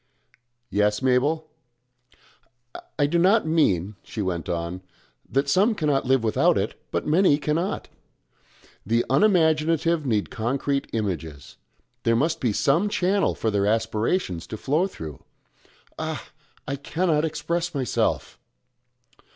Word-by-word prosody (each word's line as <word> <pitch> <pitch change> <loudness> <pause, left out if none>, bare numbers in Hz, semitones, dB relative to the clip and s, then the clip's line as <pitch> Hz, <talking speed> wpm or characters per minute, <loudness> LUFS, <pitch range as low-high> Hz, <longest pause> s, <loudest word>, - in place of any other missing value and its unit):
"Yes, 105 +3 +1
Mabel?" 145 +5 +2 1.5
"I 145 - +3
do 170 +4 +1
not 195 +4 +4
mean," 105 - +1
she 105 - -5
went 90 -3 -3
on, 85 +1 -3 0.5
"that 135 +2 +1
some 200 +10 +3
cannot 145 -7 0
live 130 -2 +3
without 110 - +3
it, - - -1 0.2
but - - -2
many 155 -1 +4
cannot. 155 +6 -2 1.0
The 115 +3 +1
unimaginative 160 -1 +3
need 105 -4 0
concrete 135 +4 -1
images. 80 -10 -4 0.4
There 115 -1 +2
must 155 +7 +1
be 120 - +1
some 160 - +2
channel 195 +1 +1
for 110 - -1
their 100 -1 +1
aspirations 110 - 0
to 110 - -6
flow 155 - +1
through 80 - -9 0.8
Ah! - - -5 0.4
I 140 - -2
cannot 155 +2 0
express 165 +2 -2
myself!" 130 -4 -1
140 Hz, 120 wpm, -24 LUFS, 110-165 Hz, 1.5 s, not